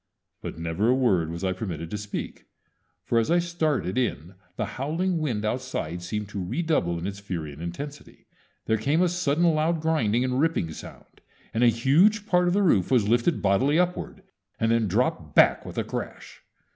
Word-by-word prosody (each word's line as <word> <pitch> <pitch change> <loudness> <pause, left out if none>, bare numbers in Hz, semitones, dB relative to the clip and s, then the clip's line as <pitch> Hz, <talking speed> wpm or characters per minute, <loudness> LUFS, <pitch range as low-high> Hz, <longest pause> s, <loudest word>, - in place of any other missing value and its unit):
But - - -6
never 85 +6 -1
a 125 - +4
word 95 -11 +2
was 85 +2 -6
I 95 -1 +1
permitted 85 -5 -5
to 105 - -2
speak; 105 -1 -6 0.6
for 115 - +2
as 115 - 0
I 170 - +4
started 155 - 0
in 90 - -2 0.2
the - - -2
howling 165 +6 -2
wind 120 -9 -2
outside 105 -8 -3
seemed 105 +4 -4
to 105 - -5
re 120 - -2
double 85 - +1
in 85 - -5
its 100 +1 -4
fury 85 -7 -5
and 75 - -11
intensity. 140 - -8 0.4
There 110 -1 +1
came 145 - +2
a - - +3
sudden 170 -2 0
loud 165 0 +2
grinding 125 -8 +1
and 130 0 0
ripping 155 - +1
sound, - - -12 0.3
and 115 - +1
a - - +7
huge 155 - +3
part 180 -3 +2
of 175 - +2
the 205 - +3
roof 100 - +3
was 120 -5 +3
lifted 120 +7 +1
bodily 125 +10 +3
upward, 180 +2 -1 0.4
and 115 0 +2
then 115 -2 +2
dropped 90 - -1
back - - +5
with - - -9
a - - +1
crash. - - -7
120 Hz, 195 wpm, -26 LUFS, 95-160 Hz, 0.6 s, a